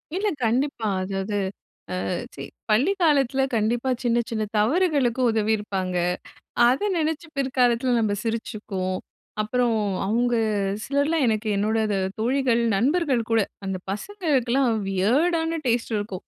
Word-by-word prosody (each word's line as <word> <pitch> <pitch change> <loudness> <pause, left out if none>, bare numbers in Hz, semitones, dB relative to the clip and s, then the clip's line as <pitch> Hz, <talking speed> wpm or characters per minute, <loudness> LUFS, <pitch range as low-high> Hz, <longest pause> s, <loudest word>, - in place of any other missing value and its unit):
இல்ல. 405 +3 0 0.2
கண்டிப்பா. 235 0 0 0.2
அதாவது 195 +2 -2 0.7
அ - - -2 0.3
சி - - -7 0.3
பள்ளிக்காலத்தில 275 - +3
கண்டிப்பா 235 +4 0
சின்ன 240 -1 +2
சின்ன 220 -2 -1
தவறுகளுக்கு 265 - +2
உதவியிருப்பாங்க. 210 -4 -1 0.7
அத 255 +7 +2 0.2
நினச்சு 320 +1 -1
பிற்காலத்தில 255 -2 +2
நம்ம 215 -2 +1
சிரிச்சுக்குவோம். 210 -5 -3 0.4
அப்புறம் 240 +1 +1 0.3
அவுங்க 240 +3 +1 0.5
சிலர்லாம் 285 +2 +1
எனக்கு 220 0 0
என்னோட 215 +2 +1
த 200 - +1 0.2
தோழிகள் 245 0 +2 0.2
நண்பர்கள் 270 - +2
கூட 225 - +4 0.3
அந்த 190 -1 -2
பசங்களுக்குலாம் 270 - 0 0.2
வியர்டான 325 - +1
டேஸ்ட் 235 -1 0
இருக்கும். 205 -3 -5
240 Hz, 110 wpm, -24 LUFS, 215-280 Hz, 0.7 s, கூட